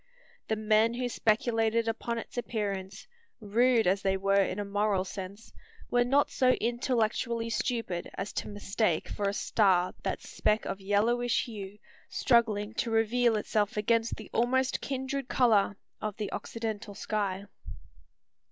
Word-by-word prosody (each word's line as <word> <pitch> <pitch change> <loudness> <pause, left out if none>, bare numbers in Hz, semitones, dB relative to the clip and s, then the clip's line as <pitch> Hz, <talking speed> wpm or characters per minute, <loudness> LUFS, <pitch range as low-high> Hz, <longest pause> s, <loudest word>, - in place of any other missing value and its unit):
The 220 - +1
men 215 +2 +3
who 250 0 -1
speculated 225 0 +1
upon 230 +1 -2
its 230 - -7
appearance, 200 -5 -3 0.3
rude 230 +2 +3
as 190 +2 +2
they 190 -1 +1
were 195 +1 +3
in 185 - -3
a 205 - -2
moral 200 -1 +1
sense, 200 +3 -8 0.4
were 245 0 +4
not 275 +4 +2
so 255 -1 +4
intellectually 235 -1 0
stupid 225 -8 -2
as 195 +2 -4
to - - -3
mistake 205 -3 -1
for 200 -1 -1
a - - -3
star 185 -6 +2
that - - -3
speck 215 +1 0
of 195 - -4
yellowish 230 +5 +2
hue, 205 -3 -8 0.3
struggling 220 -4 +2
to 230 - -1
reveal 225 +1 +2
itself 210 -1 0
against 230 +2 +1
the 215 - -11
almost 255 +2 +1
kindred 270 0 -3
colour 215 -6 +3 0.2
of 215 -2 -3
the 210 -2 -3
occidental 220 -2 -5
sky. 200 -2 -2
220 Hz, 145 wpm, -29 LUFS, 200-235 Hz, 0.4 s, were